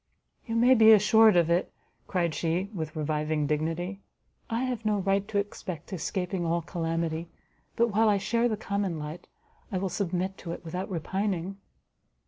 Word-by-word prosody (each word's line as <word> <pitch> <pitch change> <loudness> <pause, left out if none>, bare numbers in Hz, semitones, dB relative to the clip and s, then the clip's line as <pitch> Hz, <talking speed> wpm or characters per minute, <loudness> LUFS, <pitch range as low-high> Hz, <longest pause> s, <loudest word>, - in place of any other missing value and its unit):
"You 225 - -2
may, 245 +3 +6
be 220 -2 +8
assured 215 +1 +6
of 170 -1 +3
it," 175 +2 +1 0.4
cried 170 -4 0
she, 175 +5 -1
with 160 -4 -5
reviving 155 0 -1
dignity, 165 +6 -2 0.5
"I 230 +2 -1
have 250 -3 -2
no 215 -1 +1
right 195 +1 0
to 220 -2 -2
expect 190 -4 -4
escaping 180 +1 -2
all 170 0 0
calamity, 165 -1 -2 0.5
but 235 0 +3
while 220 +1 +3
I 205 - +3
share 230 +4 +1
the 215 - -1
common 200 -4 -2
lot, 150 +3 -7 0.4
I 190 - -1
will 190 +1 -1
submit 185 0 -2
to 170 - -5
it 175 - -9
without 180 +3 -4
repining." 190 +1 -2
185 Hz, 165 wpm, -28 LUFS, 165-205 Hz, 0.5 s, be